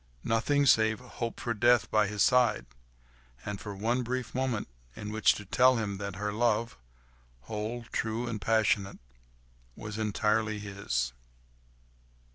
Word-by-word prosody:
Nothing, 140 +6 +2
save 110 -3 +4
to 125 - -15
hope 115 -1 -5
for 120 - -2
death 120 +2 +3
by 105 -1 +3
his 105 0 +1
side, 125 -2 +3 0.8
and 105 -1 -5
for 105 -2 -6
one 115 +6 0
brief 125 -1 -3
moment 130 -4 -1 0.3
in 105 0 -6
which 110 0 +3
to 105 - -8
tell 130 +6 +4
him 105 -4 -2
that 100 -2 -5
her 105 +1 -3
love—whole, 70 - -4
true 110 +2 -2
and 110 -3 -4
passionate—was - - -3
entirely 110 0 0
his. 95 -12 -3
105 Hz, 130 wpm, -29 LUFS, 95-115 Hz, 0.8 s, save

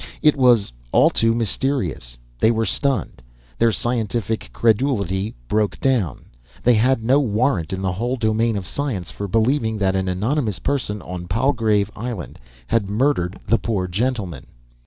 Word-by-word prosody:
It 150 -2 +6
was 120 - +3 0.2
all - - +5
too 115 0 +2
mysterious. 100 - -1 0.2
They 110 - +4
were 115 -1 +1
stunned. 135 - -1 0.4
Their 115 0 +4
scientific 115 - -2
credulity 105 - +1
broke 105 - 0
down. 115 - 0 0.4
They 125 - +5
had 115 +1 +2
no 130 +5 +4
warrant 110 - 0
in 95 0 -3
the 95 - 0
whole 120 +8 -2
domain 110 -1 +1
of 95 - -5
science 100 - -3
for 100 - -5
believing 110 +2 +1
that 95 -2 +1
an 95 0 0
anonymous 105 - -1
person 105 -1 -2
on 90 -1 -6
Palgrave 110 -1 +1
Island 115 -5 -6 0.3
had 105 - 0
murdered 105 -5 0
the 115 +2 +3
poor 95 -3 -1
gentlemen. 105 -1 -2
110 Hz, 150 wpm, -21 LUFS, 95-125 Hz, 0.4 s, It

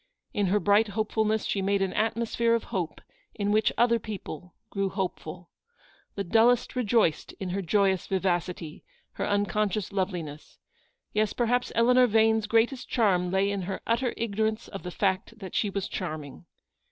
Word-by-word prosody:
In 205 -2 +1
her 205 +3 +2
bright 205 +2 +4
hopefulness 215 +1 0
she 200 - -1
made 195 0 +1
an 190 - -2
atmosphere 230 +1 +1
of 230 - -1
hope 175 -5 -3 0.3
in 205 0 -1
which 215 0 +3
other 235 -1 +4
people 180 -5 -8 0.2
grew 195 -1 -1
hopeful. 180 -3 -5 0.6
The 200 - -2
dullest 230 +7 +3
rejoiced 225 -9 +1
in 190 - -6
her 195 +2 -2
joyous 190 0 +1
vivacity, 175 -4 -2 0.3
her - - -3
uncon 205 +1 +1
scious 200 0 -4
loveliness. 175 -6 -4 0.6
Yes, 215 0 +1
perhaps 245 +1 0
Eleanor 250 +2 +5
Vane's 220 -1 +3
greatest 230 +4 +1
charm 185 -6 +2
lay 195 +2 +1
in 200 -1 -2
her 195 - -3
utter 235 +2 0
ignorance 220 0 -1
of 195 - -7
the 180 - -6
fact 190 +4 -1
that 190 -4 -9
she 210 - +1
was 195 -1 -3
charming. 155 -2 -6
205 Hz, 160 wpm, -27 LUFS, 185-225 Hz, 0.6 s, Eleanor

